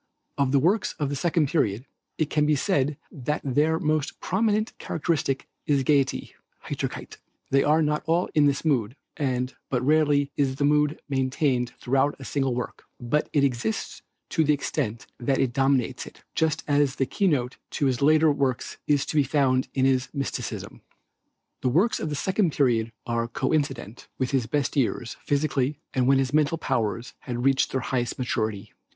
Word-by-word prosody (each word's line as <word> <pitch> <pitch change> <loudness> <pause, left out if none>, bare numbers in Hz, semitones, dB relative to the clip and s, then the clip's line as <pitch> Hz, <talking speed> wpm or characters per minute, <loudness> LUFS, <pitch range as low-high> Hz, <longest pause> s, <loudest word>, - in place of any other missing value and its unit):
Of 140 -2 +1
the 140 - +4
works 185 +10 +2
of 145 -3 -2
the 145 - -2
second 160 +1 +1
period, 125 - 0 0.3
it 155 -2 -1
can 150 -1 +2
be 150 - +4
said 145 -3 +1
that 150 +2 -2
their 150 +4 +2
most 155 -2 -1
prominent 215 +3 0
characteristic 145 -4 -1 0.2
is 140 -2 +2
gayety 140 -1 +1 0.3
(Heiterkeit). - - -5 0.3
They 135 0 +4
are 155 +2 +3
not 150 0 0
all 170 +3 +2
in 150 -2 +5
this 140 +3 0
mood, 125 -6 +1 0.2
and 130 -3 -1 0.2
but 125 -1 0
rarely 145 -2 +3
is 135 -2 +1
the 145 - 0
mood 150 +1 +2
maintained 130 -2 0
throughout 135 +3 +1
a 135 - -10
single 135 -3 0
work, 125 - -5
but 125 +5 0
it 145 - +2
exists 120 -5 -1 0.3
to 160 - +2
the 150 0 +3
extent 115 -5 -3
that 130 +2 +1
it 125 -3 +1
dominates 135 -2 +1
it, - - -14
just 160 -1 0
as 145 -2 +2
the 135 - +1
key 195 +8 0
note 130 -6 0 0.2
to 145 - +1
his 130 -1 +1
later 155 +2 +5
works 135 -3 -1
is 145 -2 +2
to - - -5
be 145 - +5
found 130 -2 +2
in 130 -1 +3
his 130 -1 +2
mysticism. 140 -2 -4 0.8
The 125 - +1
works 180 - +2
of 155 - -3
the 150 - -2
second 185 +1 +1
period 115 -5 +2
are 115 -1 -1
coincident 135 -3 -2
with 130 -1 -1
his 130 -5 +1
best 140 +4 -1
years 120 -3 -1
physically 145 -1 0 0.2
and 125 -1 +1
when 135 0 +5
his 135 0 0
mental 155 +1 +2
powers 115 -4 -2
had 120 -1 -4
reached 135 0 +3
their 130 - -1
highest 120 -1 -2
maturity. 110 -5 -2
140 Hz, 180 wpm, -25 LUFS, 130-150 Hz, 0.8 s, in